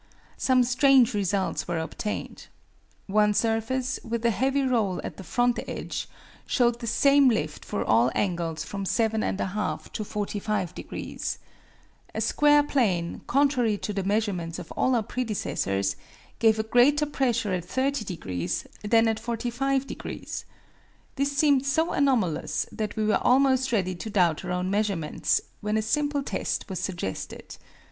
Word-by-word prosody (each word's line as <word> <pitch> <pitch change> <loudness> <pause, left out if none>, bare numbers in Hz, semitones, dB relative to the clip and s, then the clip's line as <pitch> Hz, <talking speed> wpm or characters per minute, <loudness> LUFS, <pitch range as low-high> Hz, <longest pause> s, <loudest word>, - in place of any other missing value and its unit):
Some 255 -1 +4
strange 255 0 +4
results 200 -1 -1
were 175 -1 -1
obtained. 160 +6 -5 0.6
One 210 +1 +3
surface, 230 +4 0
with 235 0 -3
a 235 - +4
heavy 270 +5 +1
roll 225 -8 +1
at - - -6
the 190 - -8
front 245 +6 +1
edge, - - -5 0.4
showed 240 -2 +2
the 235 - -5
same 275 +3 +5
lift 155 -9 -2
for 100 - -3
all 115 +3 +4
angles 170 -4 -1
from 200 +3 -5
7 220 +3 +1
1/2 200 +1 -2
to 215 - -3
45 205 -3 -2
degrees. - - -5 0.8
A - - -1
square 295 0 +4
plane, 195 -13 0
contrary 255 -6 +2
to 210 - -4
the 195 -1 -2
measurements 195 -5 -1
of 175 -3 -9
all 255 - +1
our 230 - +1
predecessors, 100 - -1 0.4
gave 220 -1 +4
a 220 - 0
greater 255 +7 +4
pressure 250 -8 0
at 175 -2 -2
30 265 +5 -1
degrees 90 - -3 0.2
than 225 +2 +4
at 220 -1 0
45 245 +4 -1
degrees. - - -6 0.7
This 280 +1 -1
seemed 285 -3 +4
so 315 +4 +1
anomalous 190 - +1
that 215 -1 -4
we 215 -1 0
were 210 - +2
almost 260 0 +3
ready 185 -5 +1
to 180 +5 -6
doubt 180 -6 +2
our 180 - -4
own 180 +1 -1
measurements, 200 -6 0 0.2
when 210 +1 -1
a 220 - 0
simple 290 +4 0
test - - -2
was 190 - -3
suggested. 175 - -5
220 Hz, 150 wpm, -26 LUFS, 185-255 Hz, 0.8 s, same